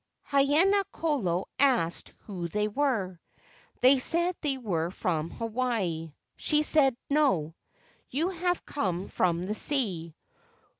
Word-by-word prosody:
Haina 300 +9 +4
kolo 205 - -1
asked 245 -12 +2
who 180 -5 -5
they 210 +4 -1
were. 210 - -1 0.6
They 260 +2 +6
said 345 +6 +1
they 280 -3 0
were 175 -9 -2
from 165 -3 -2
Hawaii. 220 -9 -2 0.3
She 300 -1 +2
said, 275 -5 +4
"No, 265 - +2 0.6
you 315 +8 0
have 355 -1 -1
come 190 -9 -2
from 175 -1 0
the 205 - -2
sea." 195 - -1
235 Hz, 115 wpm, -28 LUFS, 180-290 Hz, 0.6 s, They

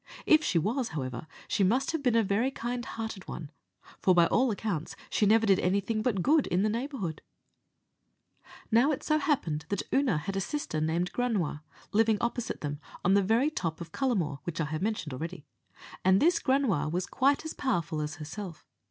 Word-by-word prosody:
If 310 -1 +5
she 180 - +1
was, 225 - 0
however, 130 +1 -4 0.2
she 200 - +1
must 240 +8 +2
have 325 -2 -2
been 250 -4 +2
a 225 +3 +2
kind 245 -1 -4
hearted 220 -5 -6
one, 155 -3 -7 0.5
for, 185 - +4
by 170 -1 +6
all 255 +8 +2
accounts, 200 -7 -3 0.2
she 210 - +3
never 225 +2 +5
did 195 -3 +4
anything 200 +4 0
but 215 -6 0
good 300 0 +4
in 180 +2 +1
the 215 - +2
neighbourhood. 230 - -3 1.5
Now 235 +6 +5
it 280 - -3
so 305 0 +2
happened 165 - -1
that 200 - -1
Oonagh 260 - +2
had 195 +5 -4
a 195 - 0
sister 195 - -3
named 170 +3 0
Granua, 205 -12 -1 0.3
living 220 0 +4
opposite 235 0 -2
them, 145 -1 -3 0.3
on 185 - +5
the 200 - +5
very 230 +9 +2
top 165 - -3
of 170 -1 -8
Cullamore, 180 - 0
which 170 -1 -5
I 160 - +1
have 155 +2 -4
mentioned 200 -8 -2
already, 165 +3 -6 0.6
and 190 +1 +5
this 340 +2 +4
Granua 260 - +1
was 180 +2 -1
quite 280 +4 +1
as 315 - -4
powerful 170 - -1
as 150 +1 -4
herself. 165 +3 -7
200 Hz, 185 wpm, -29 LUFS, 165-245 Hz, 1.5 s, by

